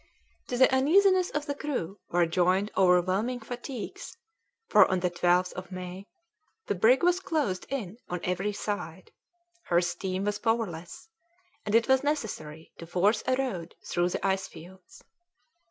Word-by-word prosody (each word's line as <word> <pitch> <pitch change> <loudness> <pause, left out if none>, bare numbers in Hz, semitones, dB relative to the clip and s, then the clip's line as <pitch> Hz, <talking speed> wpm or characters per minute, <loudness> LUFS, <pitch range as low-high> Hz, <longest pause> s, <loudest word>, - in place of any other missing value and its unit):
To 245 - -2
the 260 +1 +5
uneasiness 370 +7 +4
of 295 0 -3
the 285 - -2
crew 250 - -4
were 175 0 +3
joined 185 +4 +1
overwhelming 190 +6 +2
fatigues, 245 - -7 0.5
for 210 -3 +6
on 185 -1 0
the 180 -1 0
12th 180 +1 +2
of 185 0 -8
May 185 +2 -7 0.6
the - - 0
brig 225 - +4
was 355 +1 +3
closed 290 - -2
in 225 -7 -4
on 180 - -3
every 185 +3 -1
side; 190 -4 -5 0.5
her 175 - +3
steam 185 +2 -2
was 205 0 -1
powerless, 225 - -2 0.6
and 210 - +1
it 230 0 +4
was 265 0 +3
necessary 180 - -4
to 170 - -9
force 190 +6 +2
a 255 - +3
road 230 -11 -3
through 175 0 0
the - - -3
ice 190 -1 0
fields. 180 +2 -14
195 Hz, 155 wpm, -28 LUFS, 180-255 Hz, 0.6 s, for